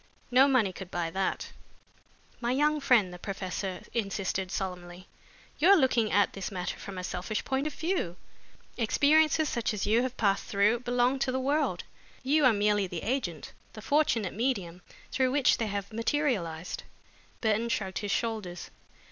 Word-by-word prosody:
No 260 +3 +6
money 235 -9 +2
could 190 -1 -8
buy 170 -2 -2
that." 190 +2 -2 0.9
"My 240 0 -1
young 300 +3 +2
friend," 235 -10 +3
the 180 - -9
professor 190 -1 -4
insisted 195 -4 -2
solemnly, 180 -1 -5 0.5
"you 335 +6 +5
are 400 - +9
looking 245 -7 +2
at 205 - +3
this 195 - -4
matter 180 -3 -4
from 195 -2 -8
a 185 - -4
selfish 185 +4 -3
point 270 +2 0
of 305 - -5
view. 325 - -1 0.6
Experiences 305 +6 +3
such 235 -4 -1
as 200 - -2
you 225 +3 +3
have 255 0 -3
passed 200 -3 +1
through, 210 +4 +2
belong 245 +2 +1
to 260 - 0
the 260 - -1
world. 290 +4 0 0.4
You 290 +2 +3
are 255 - +7
merely 205 -1 +2
the 175 -2 -6
agent, 215 - -3 0.2
the 215 - -9
fortunate 240 -10 +1
medium, 195 -7 -2 0.3
through 260 -1 +2
which 275 0 +3
they 225 - 0
have 200 +1 -4
materialized." 220 - -1 0.6
Burton 220 +1 +1
shrugged 195 -6 -2
his 205 - -4
shoulders. 205 -6 -3
220 Hz, 165 wpm, -29 LUFS, 190-260 Hz, 0.9 s, are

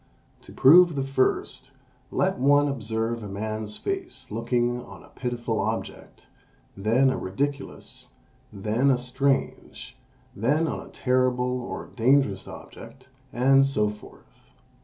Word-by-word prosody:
To - - -14
prove 170 +4 +6
the 135 - -1
first, 135 -1 -1 0.4
let 190 +5 0
one 145 +2 +4
observe 115 -3 -2
a 105 - -7
man's 110 +1 -4
face 365 - -5
looking 120 +2 -1
on - - -13
a - - -18
pitiful 120 -3 -3
object, 110 +3 -5 0.5
then 115 +7 +2
a - - -2
ridiculous, 140 +9 -4 0.4
then 110 +7 0
a 130 - +4
strange, 135 +2 -2 0.4
then 145 +10 +1
on - - -3
a - - -14
terrible 125 -1 0
or 120 - -6
dangerous 120 -5 +2
object, 130 -1 -12 0.2
and 135 +3 +4
so 105 -7 +1
forth. 105 0 -17
125 Hz, 125 wpm, -25 LUFS, 110-135 Hz, 0.5 s, prove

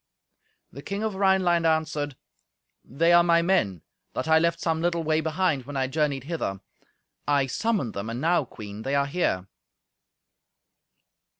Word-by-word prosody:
The 140 - -10
King 200 +6 -4
of 220 -2 -1
Rhineland 190 -3 +2
answered, 155 -3 -1 0.7
"They 165 +7 +2
are 175 - +8
my 170 -1 +3
men, 140 - +1 0.3
that - - -3
I 160 0 +5
left 170 +1 +1
some 160 -1 -1
little 170 -1 0
way 155 0 +1
behind 160 -4 0
when 145 -1 -5
I 130 - +1
journeyed 140 -1 -1
hither. 140 - -3 0.7
I 140 -2 +3
summoned 190 - -1
them, 100 +3 -5
and 115 +1 -4
now, 165 0 +2
Queen, 105 -2 -9
they 135 +5 -1
are 140 0 +2
here." 140 - -1
160 Hz, 155 wpm, -26 LUFS, 135-170 Hz, 0.7 s, are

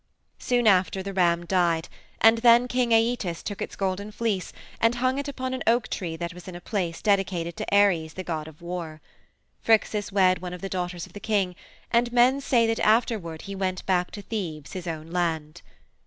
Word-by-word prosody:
"Soon 245 -1 +1
after 190 -1 +3
the 195 0 -5
ram 175 -2 +2
died, 170 -2 +1 0.3
and 225 +1 +6
then 240 +1 +6
King 250 -1 0
Æetes 225 -6 +1
took 205 - -5
its - - -4
golden 195 +2 -2
fleece 210 -4 -2 0.3
and 230 +1 +3
hung 255 +2 0
it 285 - -4
upon 260 -2 -4
an 260 - -4
oak 230 0 +3
tree 170 -4 -3
that 170 +1 -5
was 180 +1 -12
in 185 - -7
a - - -6
place 175 -4 -3
dedicated 190 -5 +1
to - - -4
Ares, 190 -6 +3
the 185 - -6
god 160 -3 -4
of 160 +1 -14
war. 170 -3 -5 0.6
Phrixus 215 -2 +2
wed 185 -2 +3
one 180 -1 -5
of 180 - -8
the 195 - -4
daughters 180 -2 -3
of - - -18
the 205 - -8
king, 200 -4 0 0.4
and 240 0 +2
men 250 +3 +4
say 240 -4 +3
that 225 0 0
afterward 215 -7 +1
he 200 - -6
went 190 -1 -3
back 180 -2 +1
to 205 - -9
Thebes, 165 -10 -5
his 185 -2 -6
own 160 0 -5
land. 160 -4 -2
190 Hz, 200 wpm, -26 LUFS, 175-225 Hz, 0.6 s, and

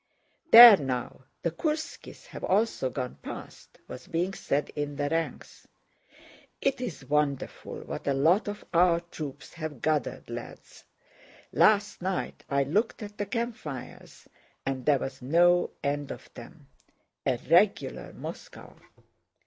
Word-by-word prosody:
"There 235 -5 +12
now, 130 -2 -4 0.2
the 170 - 0
Kúrskies 310 - -4
have - - -10
also 200 - +1
gone 125 -1 -5
past," - - -10
was 125 - -10
being 175 +3 -1
said 145 -4 -1
in 145 -1 -3
the 145 0 -1
ranks. 165 +1 -4 0.9
"It's 250 - -2
wonderful 145 0 -2
what - - -7
a 140 - +2
lot 165 +11 +3
of 205 0 -6
our 170 0 +4
troops 155 -5 -8
have 155 -5 -6
gathered, 155 -4 -1
lads! - - -9 0.7
Last 205 -2 +3
night 185 +1 -3
I 140 0 +2
looked 210 - -1
at 205 0 -10
the 205 - -2
campfires 225 - -6 0.4
and 135 -1 -3
there 145 -2 +5
was 135 0 -6
no 175 +6 +4
end 145 0 -2
of - - -9
them. - - -13 0.6
A - - +2
regular - - +2
Moscow!" - - -10
160 Hz, 130 wpm, -28 LUFS, 140-200 Hz, 0.9 s, There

